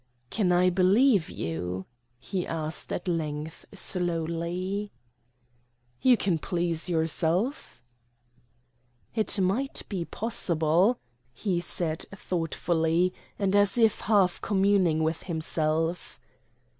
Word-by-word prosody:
"Can 195 -5 +1
I 180 +1 +4
believe 195 - +4
you?" 90 +3 -4 0.3
he 180 +7 -3
asked 160 0 -3
at 180 - -3
length 155 -2 -3
slowly. 180 +2 -1 1.1
"You 250 -2 +5
can 180 -6 0
please 170 -1 -1
yourself." 165 - 0 1.3
"It 215 -2 +1
might 205 +9 0
be 185 -5 -3
possible," 180 0 +1 0.4
he 180 - -1
said 165 -2 -2
thoughtfully, 170 -1 0 0.2
and 200 -1 +1
as 205 +2 +4
if 225 -2 +4
half 195 -4 +2
communing 190 -5 +2
with 160 +1 -1
himself. 160 +1 -1
175 Hz, 95 wpm, -27 LUFS, 160-200 Hz, 1.3 s, You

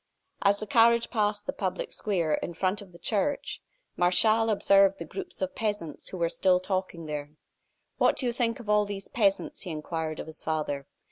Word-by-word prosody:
As 200 0 +4
the 215 - -5
carriage 235 +2 +4
passed 210 -2 0
the - - -2
public 185 -2 -3
square 175 -7 0
in 170 - -2
front 190 +3 0
of 195 -3 -13
the 170 - -14
church, 260 +10 -1 0.3
Martial 215 +6 +3
observed 195 -2 +4
the - - -6
groups 365 -6 -6
of 280 0 -2
peasants 205 - -3
who 185 - -6
were 170 -1 +2
still 180 +2 +3
talking 185 -3 -3
there. 150 0 -5 0.6
"What - - +4
do 260 - -2
you 240 - +2
think 230 -1 0
of 235 - -10
all 210 0 +4
these 195 -1 -5
peasants?" 200 -5 0
he 185 - -6
inquired 155 0 -4
of - - -5
his 160 0 -10
father. 150 -3 -2
195 Hz, 195 wpm, -28 LUFS, 170-215 Hz, 0.6 s, As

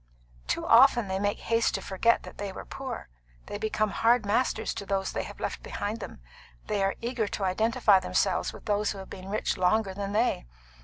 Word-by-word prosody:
"Too - - -1
often 240 -2 +6
they 190 0 -2
make 205 0 -1
haste 230 0 +1
to 195 - -3
forget 230 +5 +2
that - - -11
they 200 -1 -3
were - - -8
poor; 265 - -6 0.4
they 205 - -6
become 215 -1 0
hard 230 -1 +3
masters 220 +1 0
to - - -5
those 195 -1 -1
they - - -2
have - - -10
left - - -3
behind 210 +3 -4
them. 130 - -8 0.4
They 205 -1 -1
are 195 0 +1
eager 235 -2 -1
to 200 - -4
identify 215 +1 +3
themselves 185 - 0
with - - -13
those 210 0 +1
who - - -10
have 190 -1 -9
been 190 0 -8
rich 210 +2 -1
longer 190 +2 +2
than 200 +1 -4
they. 215 - +1
205 Hz, 205 wpm, -28 LUFS, 195-230 Hz, 0.4 s, often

